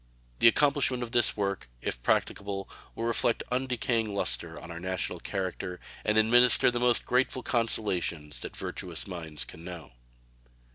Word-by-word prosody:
The - - +7
accomplishment 140 -1 +3
of 115 - -6
this 120 -3 +4
work, 100 -11 -2
if - - -4
practicable, 100 +8 -1 0.3
will 115 - -4
reflect 115 0 +1
undecaying 125 -3 0
luster 80 0 0
on 85 - -10
our 85 - -6
national 95 0 -3
character 95 -2 -4 0.2
and 105 0 +1
administer 120 +3 +6
the 120 - -2
most 120 0 +2
grateful 130 0 +1
consolations 95 - 0
that - - -7
virtuous - - -4
minds 80 -5 -4
can 80 - -11
know. 85 -5 -9
105 Hz, 145 wpm, -29 LUFS, 85-120 Hz, 0.3 s, The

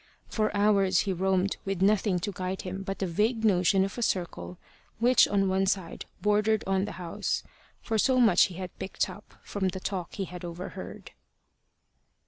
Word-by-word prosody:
For 215 -1 0
hours 200 -3 +3
he 195 - -1
roamed 190 +1 +1
with 195 -1 -1
nothing 200 -1 +3
to 205 +2 -2
guide 185 0 -4
him 190 +1 -5
but 195 0 -4
the 195 - -1
vague 220 +6 0
notion 190 -1 +4
of 195 - -6
a - - -3
circle 90 - -2 0.4
which 245 +2 +5
on 195 -1 +1
one 190 +1 +1
side 190 -3 -2 0.2
bordered 210 +1 +2
on 195 0 +1
the 210 - -6
house, 175 -2 -3 0.4
for 220 -1 0
so 260 +3 +3
much 220 -8 +6
had 185 0 -7
he - - -35
picked 190 - -2
up - - -14
from 195 -2 -2
the 185 0 -3
talk 185 -2 -4
he 195 - -2
had 180 0 -9
overheard. 175 +1 -7
195 Hz, 180 wpm, -28 LUFS, 185-210 Hz, 0.4 s, much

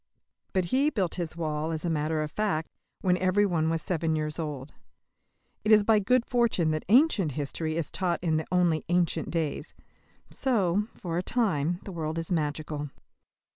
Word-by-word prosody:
But 185 -2 +1
he 275 +3 +4
built 190 - -1
his 170 -2 -4
wall, 155 -1 -2
as 160 +1 -4
a - - 0
matter 155 0 0
of 150 - -5
fact, 190 -7 -1 0.3
when 180 -2 +2
every 185 +3 +3
one 165 -4 +1
was 165 -1 -1
seven 165 -3 0
years 155 +1 -3
old. 150 -3 -5 0.9
It 215 - +1
is 210 -1 +7
by 215 0 +4
good 245 +4 +2
fortune 230 -10 +2
that 155 0 -2
"ancient" 225 - +4
history 155 +3 -3
is 165 -2 -2
taught 180 -2 0
in 160 -3 +2
the 155 - -3
only 175 -4 +2
ancient 175 -1 +1
days. 165 -3 -3 0.6
So, 210 -6 +1
for 170 -1 -3
a - - 0
time, 180 - 0
the 195 - -7
world 160 -2 -3
is 165 +2 -4
magical. 150 -2 -2
170 Hz, 175 wpm, -28 LUFS, 155-195 Hz, 0.9 s, is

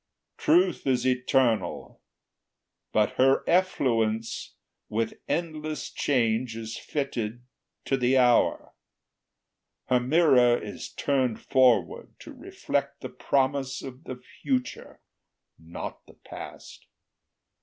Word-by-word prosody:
Truth 180 0 +2
is 130 -1 +1
eternal, 125 -2 0 0.9
but 105 -1 +2
her 135 +1 +4
effluence, 115 -11 0 0.3
With 115 +1 -1 0.2
endless 155 -2 -3
change 115 -3 0
is 115 0 -6
fitted 120 -5 -4 0.4
to 135 - +1
the 130 +1 +2
hour; 125 -2 +3 1.2
Her 125 -1 +4
mirror 125 -3 +4
is 105 -3 -7
turned 130 -5 -1
forward 120 -10 +2
to - - -10
reflect - - -4
The - - -6
promise 135 -1 -1
of 130 +3 -10
the 130 - -6 0.3
future, 255 -2 -3 0.6
not 80 +1 -8
the - - -17
past. - - -11
130 Hz, 100 wpm, -26 LUFS, 115-140 Hz, 1.2 s, her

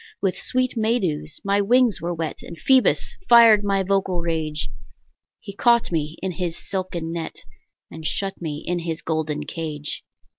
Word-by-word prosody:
With 195 -2 0
sweet 255 0 0
May 225 +1 +2
dews 155 -6 -3
my 200 0 +2
wings 240 +1 +3
were 170 +1 -2
wet, 165 -2 -4
And 170 - -10
Phoebus 260 +6 +3
fired 230 -3 +8
my 195 -1 +1
vocal 190 -2 0
rage; 155 -5 -2 0.7
He 200 - -10
caught 235 -1 +3
me 155 -1 -2
in 190 - -1
his 175 -2 -3
silken 180 -4 -4
net, 165 -1 -6 0.5
And 160 - -9
shut 195 +5 -2
me 150 -3 -4
in 175 0 -1
his 165 -1 -4
golden 155 -2 -2
cage. 150 -1 -5
175 Hz, 160 wpm, -23 LUFS, 160-200 Hz, 0.7 s, fired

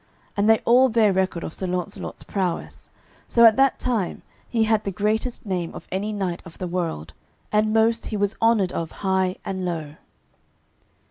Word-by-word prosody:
And 205 +1 +2
they 225 - +7
all 255 +2 +6
bare 220 -3 +3
record 185 -2 0
of 160 - -5
Sir 190 - -3
Launcelot's 180 +2 -4
prowess, 185 -4 -3 0.4
so 235 0 +5
at 220 -1 +8
that 270 0 +4
time 225 -8 -2 0.3
he 230 -2 +2
had 220 -1 +2
the 200 - -2
greatest 215 +6 -1
name 180 -4 -3
of - - -10
any 200 +3 -2
knight 190 -4 -3
of 170 -3 -13
the 185 - -4
world, 165 - -3 0.4
and 215 0 +2
most 225 +1 +2
he 215 - -3
was 205 +1 0
honoured 225 -5 +3
of 165 -2 -3
high 190 -1 +1
and 190 -1 -3
low. 160 -4 -4
200 Hz, 180 wpm, -23 LUFS, 180-220 Hz, 0.4 s, at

